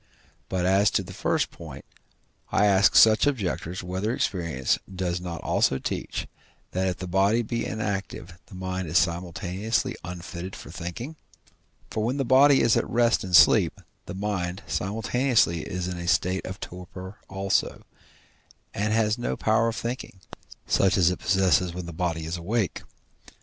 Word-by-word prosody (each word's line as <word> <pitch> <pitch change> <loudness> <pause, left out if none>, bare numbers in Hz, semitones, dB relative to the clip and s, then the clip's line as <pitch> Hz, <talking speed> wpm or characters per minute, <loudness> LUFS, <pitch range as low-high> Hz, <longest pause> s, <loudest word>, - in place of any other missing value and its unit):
But, 90 -1 -1
as 95 +2 +4
to - - -2
the - - -10
first - - 0
point, - - -10 0.7
I 105 - +3
ask 100 -1 +4
such 110 +4 +7
objectors, 95 - -2
whether 95 +6 -2
experience 85 - -1
does 90 -1 -2
not 85 -2 -6
also 65 - +2
teach, - - -4 0.5
that 95 +1 0
if 90 - -2
the 95 - -6
body 100 +6 +2
be 115 +1 -3
inactive 100 -4 -4
the - - -12
mind 95 -1 -4
is 80 +3 +2
simultaneously 90 +7 -1
unfitted 90 +1 -7
for - - -10
thinking? 115 - -6 0.7
For 110 - -1
when 125 +5 -1
the 135 - 0
body 135 +3 +6
is 115 - +4
at - - 0
rest 120 -1 +2
in 90 -3 +1
sleep, - - +6 0.3
the 90 - -6
mind 95 -2 -3
simultaneously 105 - +1
is 90 +5 -4
in 90 -1 -4
a 85 - -5
state 90 -1 +1
of 95 +1 -7
torpor 90 +2 -9
also, 95 0 -1 0.9
and 105 +2 0
has 110 +1 +1
no 120 - -2
power 110 +1 +2
of 115 - -2
thinking, 120 -5 -5 0.5
such 95 0 +2
as 90 -1 +4
it 90 - -4
possesses 90 -1 +2
when 90 -1 -5
the 85 - -7
body 80 -1 -2
is 80 +2 -3
awake. 100 +4 -1
95 Hz, 160 wpm, -26 LUFS, 90-110 Hz, 0.9 s, such